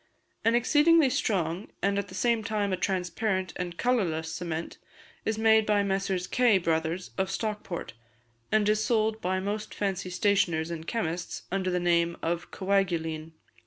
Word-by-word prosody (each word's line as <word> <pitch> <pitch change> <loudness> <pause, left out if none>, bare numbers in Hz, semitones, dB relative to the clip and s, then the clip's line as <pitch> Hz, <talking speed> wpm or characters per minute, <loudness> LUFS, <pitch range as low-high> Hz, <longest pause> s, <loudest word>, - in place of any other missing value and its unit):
An 230 +1 +4
exceedingly 295 +3 +5
strong, 185 -5 -1 0.2
and 200 0 +2
at 200 - -3
the - - -10
same 235 -2 +1
time 205 -2 -1
a - - +3
transparent 185 +1 -1
and 175 -2 -4
colourless 165 -10 0
cement 165 -1 -4 0.5
is 220 0 0
made 220 0 +5
by 205 -1 +3
Messrs. 195 -2 -1
Kay 240 -1 +4
Brothers, 165 0 -1
of 190 0 +1
Stockport, 205 - -4 0.6
and 215 -1 +3
is 215 0 +2
sold 220 -1 +1
by 185 +1 0
most 210 +2 -4
fancy 195 -2 -2
stationers 180 -4 +1
and 165 -1 -6
chemists 175 -7 -3
under 190 -1 0
the 180 0 +1
name 170 -1 +2
of 170 +1 -2
Coaguline. 165 -5 -1
190 Hz, 155 wpm, -28 LUFS, 170-215 Hz, 0.6 s, exceedingly